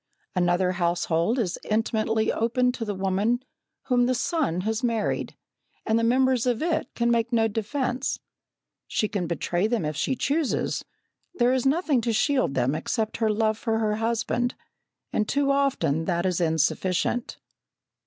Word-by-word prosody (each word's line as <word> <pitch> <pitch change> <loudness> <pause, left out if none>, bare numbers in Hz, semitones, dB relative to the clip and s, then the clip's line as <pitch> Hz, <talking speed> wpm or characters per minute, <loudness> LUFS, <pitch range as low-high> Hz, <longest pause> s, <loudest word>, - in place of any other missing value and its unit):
Another 180 0 +2
household 175 +3 0
is 195 -8 -1
intimately 220 0 +1
opened 250 +2 +1
to 240 - -4
the 205 -2 -3
woman 195 +6 0 0.4
whom 245 -2 +2
the 255 - +1
son 245 - 0
has 220 +4 -2
married, 230 -3 -1 0.5
and 220 0 +2
the - - 0
members 255 +1 +3
of 245 +2 +1
it 320 -5 -1
can 235 0 +1
make 235 0 +1
no 225 -2 +3
defence. 250 +4 -2 0.7
She 215 - 0
can 200 -5 -2
betray 175 +3 0
them 225 -7 0
if 150 0 -2
she 210 - 0
chooses; 290 +2 0 0.5
there 245 -2 +3
is 260 0 +1
nothing 290 -3 +2
to 230 0 0
shield 260 - +1
them 130 +2 +1
except 215 +8 -2
her 225 -1 +1
love 215 0 +1
for 225 -2 0
her 215 -1 0
husband, 235 +2 -1 0.6
and 210 - 0
too 280 0 +2
often 275 - +1
that 175 0 0
is 180 -1 0
insufficient. 175 - 0
225 Hz, 155 wpm, -25 LUFS, 185-245 Hz, 0.7 s, members